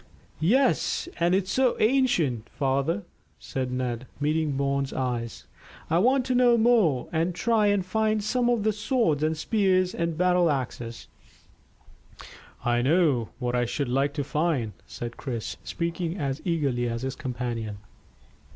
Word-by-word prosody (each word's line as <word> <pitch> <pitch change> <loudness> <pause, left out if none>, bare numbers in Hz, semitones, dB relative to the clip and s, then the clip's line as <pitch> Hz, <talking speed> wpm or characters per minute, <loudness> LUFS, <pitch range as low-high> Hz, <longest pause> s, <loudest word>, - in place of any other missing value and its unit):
"Yes, 255 - +2
and 175 +2 +3
it's 190 0 0
so 260 -2 +2
ancient, 195 - +2
father," 140 +8 0 0.3
said 130 -1 -4
Ned, 125 -1 -3
meeting 155 0 0
Bourne's 140 0 -1
eyes. 120 -3 -3 0.5
"I 165 - +4
want 255 +5 +3
to 255 - 0
know 245 -1 +5
more, 220 - +3
and 165 +2 0
to - - -9
try 225 -3 +3
and 205 -2 +2
find 215 +2 0
some 240 +3 +1
of 235 -4 +1
the 215 0 +2
swords 210 - +1
and 155 +1 0
spears 185 -1 +2
and 170 -2 -2
battle 180 -1 +3
axes." 125 -4 -4 1.6
"I 120 0 +2
know 140 -4 +2
what 125 -2 -2
I 120 0 +1
should 135 +2 -2
like 140 +3 +1
to 145 - -1
find," 145 -7 -1
said 120 0 -7
Chris, 120 -5 -5
speaking 170 +1 -3
as 140 -4 -2
eagerly 140 -8 0
as 115 +1 -4
his 130 0 -3
companion. 120 -4 -4
160 Hz, 150 wpm, -26 LUFS, 130-205 Hz, 1.6 s, know